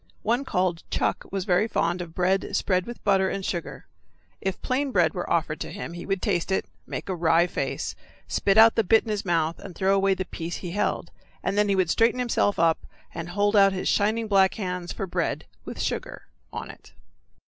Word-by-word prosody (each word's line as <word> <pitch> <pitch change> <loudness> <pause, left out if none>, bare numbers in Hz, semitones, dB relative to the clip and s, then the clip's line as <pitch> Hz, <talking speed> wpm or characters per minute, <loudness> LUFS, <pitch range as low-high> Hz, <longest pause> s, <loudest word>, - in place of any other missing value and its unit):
One 240 +5 +1
called 180 -6 0
Chuck - - -1
was 195 -1 -2
very 180 +4 +3
fond 175 -4 0
of 165 -2 -8
bread 185 +2 +1
spread 185 -2 +1
with 240 - -8
butter 195 -2 +3
and 195 -1 -3
sugar. 175 - -4 0.6
If 190 -1 -2
plain 270 +2 0
bread 175 -7 +3
were 175 - -4
offered 160 -1 0
to - - -5
him 200 -3 -6
he 175 - -8
would 195 -2 -1
taste 185 -2 0
it, 190 - +1 0.2
make - - -5
a 190 - -1
wry 170 0 +3
face, 180 - -3 0.3
spit 195 +1 +1
out 225 +1 +8
the 225 - +2
bit 220 +3 +4
in 220 - -4
his 210 -1 -2
mouth, 165 -2 0
and 185 -4 -10
throw 195 0 +2
away 195 0 +3
the 185 - -3
piece 170 -1 -5
he 175 - -6
held, 205 - -1 0.3
and 195 - -1
then 205 0 +2
he 200 - +3
would 185 -3 +2
straighten 230 +2 +3
himself 240 -4 +1
up 165 -1 +3 0.3
and 170 0 -5
hold 205 +3 +1
out 195 -1 +6
his 185 - -3
shining 220 +2 +1
black 195 -2 +4
hands 180 -4 -4
for 195 - -4
bread 180 - -2 0.2
with - - -7
sugar - - -3 0.3
on - - -6
it. - - -18
190 Hz, 215 wpm, -25 LUFS, 175-205 Hz, 0.6 s, out